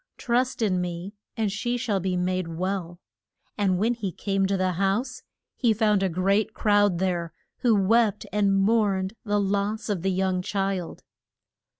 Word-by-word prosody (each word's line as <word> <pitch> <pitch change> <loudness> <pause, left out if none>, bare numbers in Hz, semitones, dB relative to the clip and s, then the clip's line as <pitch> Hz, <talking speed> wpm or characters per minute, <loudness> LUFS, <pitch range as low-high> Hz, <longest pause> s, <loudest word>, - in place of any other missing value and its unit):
Trust 250 0 0
in 185 -4 +1
me 175 +2 -5 0.2
and 215 -3 0
she 240 +5 -2
shall 215 -5 -1
be 185 0 -1
made 185 0 -1
well. 175 0 -3 0.6
And 195 -3 +1
when 225 +6 +2
he 210 -6 -4
came 195 +2 -1
to 195 0 0
the 185 0 +1
house, 200 +8 -1 0.3
he 235 -4 +2
found 210 -2 +2
a 190 - +1
great 195 +5 +1
crowd 205 -3 +3
there, 175 -3 -1 0.2
who 235 -3 +3
wept 210 +2 +2
and 200 -2 +2
mourned 195 -2 +2
the 205 -1 +1
loss 200 +2 -1
of 195 -5 -1
the 195 - 0
young 185 -1 0
child. 195 -2 -3
195 Hz, 165 wpm, -25 LUFS, 185-210 Hz, 0.6 s, crowd